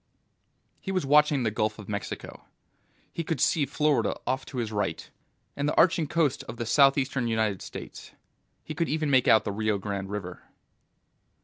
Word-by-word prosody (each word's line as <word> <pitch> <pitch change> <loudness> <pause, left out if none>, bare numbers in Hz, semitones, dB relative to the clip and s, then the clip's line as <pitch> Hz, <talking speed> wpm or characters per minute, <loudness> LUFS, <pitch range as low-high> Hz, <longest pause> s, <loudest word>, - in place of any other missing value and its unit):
He 195 - -5
was 185 -6 -1
watching 150 -1 +4
the 110 - 0
Gulf 110 0 -1
of 105 -3 -10
Mexico. 100 -2 -6 0.7
He 170 - -3
could 160 -3 -3
see 145 +2 +2
Florida 145 -5 +1
off 130 +2 -2
to 130 - -8
his 115 -3 -2
right, 105 -1 -2 0.5
and 145 +1 -1
the - - -2
arching 165 -2 +4
coast 155 -3 0
of 115 - -8
the 115 - -3
southeastern 135 0 +3
United 110 -4 0
States. - - -9 0.5
He 155 - -6
could 165 +2 -1
even 155 -1 0
make 130 -2 +4
out 110 - +6
the - - -3
Rio 105 0 0
Grande 100 -1 -4
River. 95 -3 -6
130 Hz, 175 wpm, -27 LUFS, 110-150 Hz, 0.7 s, out